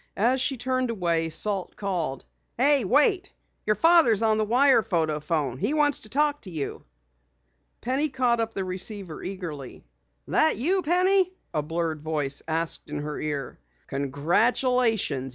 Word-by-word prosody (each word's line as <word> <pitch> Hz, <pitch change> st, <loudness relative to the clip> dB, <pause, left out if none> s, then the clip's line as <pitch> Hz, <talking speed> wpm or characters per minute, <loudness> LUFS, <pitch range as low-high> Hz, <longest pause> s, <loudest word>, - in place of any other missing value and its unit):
As 250 Hz, +5 st, +2 dB
she 270 Hz, 0 st, 0 dB
turned 255 Hz, +1 st, -1 dB
away, 170 Hz, -6 st, -1 dB
Salt 190 Hz, +3 st, -1 dB
called: 170 Hz, -10 st, -3 dB, 0.3 s
"Hey, 275 Hz, +1 st, +4 dB
wait! 300 Hz, -, +2 dB, 0.4 s
Your 215 Hz, -, +3 dB
father's 275 Hz, -, +5 dB
on 220 Hz, -1 st, +2 dB
the -, -, +2 dB
wire 255 Hz, +2 st, +4 dB
photo 160 Hz, -6 st, -1 dB
phone. 145 Hz, -5 st, -2 dB
He 295 Hz, -, -1 dB
wants 295 Hz, -1 st, +2 dB
to 215 Hz, -, -9 dB
talk 295 Hz, +3 st, +1 dB
to 195 Hz, -, -10 dB
you." 155 Hz, -5 st, -5 dB, 1.0 s
Penny 270 Hz, +5 st, -1 dB
caught 250 Hz, -3 st, +1 dB
up 225 Hz, 0 st, -3 dB
the 195 Hz, -, -2 dB
receiver 185 Hz, -1 st, -4 dB
eagerly. 170 Hz, -8 st, -7 dB, 0.4 s
"That 315 Hz, -, +2 dB
you, 365 Hz, +10 st, +1 dB
Penny?" 365 Hz, +3 st, +2 dB, 0.2 s
a 155 Hz, -, 0 dB
blurred 160 Hz, 0 st, -3 dB
voice 150 Hz, -3 st, -1 dB
asked 165 Hz, 0 st, -2 dB
in 150 Hz, -, -4 dB
her 150 Hz, 0 st, -5 dB
ear. 145 Hz, -4 st, -5 dB, 0.3 s
"Congratulations! 170 Hz, -, 0 dB
210 Hz, 150 wpm, -25 LUFS, 160-260 Hz, 1.0 s, father's